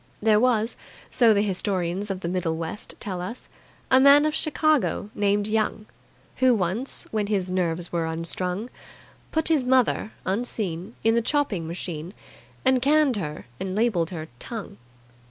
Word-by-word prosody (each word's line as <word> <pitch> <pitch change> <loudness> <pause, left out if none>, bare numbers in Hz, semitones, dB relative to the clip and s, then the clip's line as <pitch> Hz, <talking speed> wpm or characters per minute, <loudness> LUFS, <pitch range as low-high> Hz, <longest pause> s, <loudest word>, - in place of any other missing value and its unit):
There 210 0 +4
was, 230 -1 +2 0.3
so 235 -3 +5
the 205 -1 +3
historians 190 -1 -1
of 190 -1 -3
the 170 - -3
Middle 170 -2 -1
West 165 +5 -6
tell 185 -4 -4
us, 230 +8 -5 0.4
a 260 - +7
man 280 +2 +7
of 305 - +1
Chicago 305 -9 +1
named 205 0 +1
Young, 215 0 -1 0.5
who 255 -2 +4
once, 205 +7 0
when 215 -2 -1
his 190 -3 0
nerves 175 -2 -1
were 170 -1 -1
unstrung, 180 +7 -2 0.6
put 320 0 +1
his 310 -5 +3
mother 250 -4 +2
(unseen) 195 -2 -2
in 225 - +4
the 235 - +3
chopping 225 - 0
machine, 170 +1 -6 0.5
and 260 -1 +4
canned 290 -2 +3
her 150 -5 -5
and 190 0 -3
labelled 205 -7 +1
her 160 -3 -6
"Tongue". 220 - -7
205 Hz, 155 wpm, -25 LUFS, 180-245 Hz, 0.6 s, a